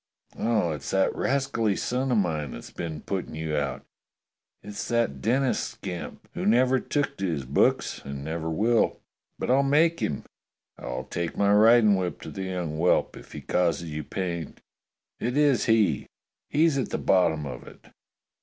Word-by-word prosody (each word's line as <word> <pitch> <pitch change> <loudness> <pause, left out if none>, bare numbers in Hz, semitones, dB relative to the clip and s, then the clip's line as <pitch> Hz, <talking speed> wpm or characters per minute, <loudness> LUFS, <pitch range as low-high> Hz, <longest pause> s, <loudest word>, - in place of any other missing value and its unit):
Oh, 110 -7 +1
it's 75 - -5
that 95 0 +2
rascally 130 -7 0
son 130 +5 -1
of 120 - +3
mine 80 -8 -1
that's - - -9
been 80 -3 -5
putting 95 -5 -4
you 80 -1 -2
out. 70 -3 -2 0.8
It's 105 0 -6
that 115 - 0
Denis 130 +3 +2
scamp, 90 -5 -6
who - - -4
never 130 +4 +4
took 145 +2 -2
to 95 - -1
his 75 -6 -2
books 65 - +1
and 70 0 -6
never 80 +1 -3
will. 110 +8 +2 0.4
But - - -1
I'll 135 +2 +5
make 160 +4 +3
him. 70 - -2 0.5
I'll 60 0 -5
take 85 -1 -4
my 100 0 +4
riding 110 0 +6
whip 90 -2 -2
to - - -8
the 95 -2 -5
young 90 -4 -3
whelp 85 +3 +2
if - - -13
he - - -6
causes 85 -2 0
you 75 0 -4
pain. 85 -2 -4 0.6
It 125 +4 -1
is 145 -3 +3
he! 110 -3 +2 0.4
He's 155 -1 +3
at 130 - -2
the - - -2
bottom 80 -5 +2
of 65 -4 -7
it. - - -15
95 Hz, 170 wpm, -26 LUFS, 80-120 Hz, 0.8 s, riding